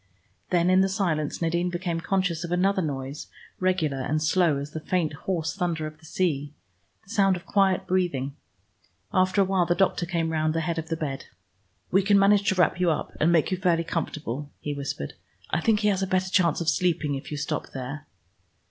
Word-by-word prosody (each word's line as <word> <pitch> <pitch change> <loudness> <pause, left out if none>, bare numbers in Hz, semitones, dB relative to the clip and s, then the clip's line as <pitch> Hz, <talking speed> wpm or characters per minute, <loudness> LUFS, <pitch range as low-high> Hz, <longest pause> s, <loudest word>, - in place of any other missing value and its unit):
Then 175 0 +3
in 185 +1 +5
the 195 - +2
silence 170 -6 -1
Nadine 170 +2 +1
became 175 -1 -2
conscious 180 -2 0
of 175 - -5
another 190 +2 +2
noise 140 -2 -4 0.3
regular 180 -7 +1
and 150 +4 0
slow 160 -1 +2
as 140 +1 -5
the 160 - -4
faint 160 -1 -1
hoarse 165 +2 -2
thunder 170 -4 -1
of 155 0 -8
the 160 - -18
sea, 150 -4 -1 0.5
the 195 - -15
sound 195 -4 +3
of 175 0 -8
quiet 195 -1 +2
breathing. 155 -8 0 0.8
After 185 +2 +3
a - - +4
while 185 -2 +1
the 175 - +2
doctor 185 -2 +1
came 165 -2 -1
round 155 0 0
the 165 - +1
head 165 0 -1
of 160 0 -6
the 165 - -1
bed. 140 -4 -4 0.7
"We 195 - +5
can 200 +1 +4
manage 200 0 +4
to 190 - +1
wrap 180 -1 +2
you 180 -1 +3
up, 155 - -2
and 160 +3 +4
make 165 0 +3
you 185 - +1
fairly 175 -2 +2
comfortable," 150 -4 -4
he 145 - -3
whispered. 140 - -4 0.4
"I - - +1
think 215 0 +2
he 210 - +3
has 195 -2 +1
a 190 - 0
better 185 0 0
chance 170 -4 +3
of 165 - -3
sleeping 165 -5 +1
if 135 - -5
you 150 - -4
stop 145 - -3
there." 135 +3 -6
170 Hz, 210 wpm, -26 LUFS, 155-185 Hz, 0.8 s, in